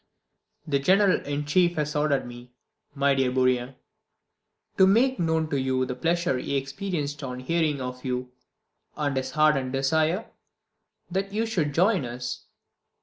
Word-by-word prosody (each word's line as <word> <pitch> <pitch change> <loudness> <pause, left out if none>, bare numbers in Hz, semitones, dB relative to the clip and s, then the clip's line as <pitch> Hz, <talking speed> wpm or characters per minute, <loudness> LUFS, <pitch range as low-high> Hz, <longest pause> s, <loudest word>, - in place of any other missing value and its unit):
The 140 -4 +1
General 190 +6 +3
in 145 +1 -2
Chief 175 +3 +2
has 150 0 -2
ordered 150 -2 +1
me, 120 0 -11 0.4
my 140 0 +3
dear 135 -2 +1
Bourrienne, 130 0 +1 1.0
to 190 - +7
make 250 +7 +3
known 160 -2 +1
to 140 - +1
you 130 0 0
the 125 - -4
pleasure 170 0 0
he 140 - -2
experienced 145 +1 -4
on 125 -1 -5
hearing 155 +1 0
of 125 0 -6
you, 125 -1 -3 0.7
and 145 -2 -1
his 130 0 -3
ardent 145 -4 +3
desire 155 +5 +1 0.9
that 195 +2 -2
you 220 +3 0
should 160 -10 -1
join 190 -1 +3
us. 125 0 -5
145 Hz, 145 wpm, -26 LUFS, 130-170 Hz, 1.0 s, to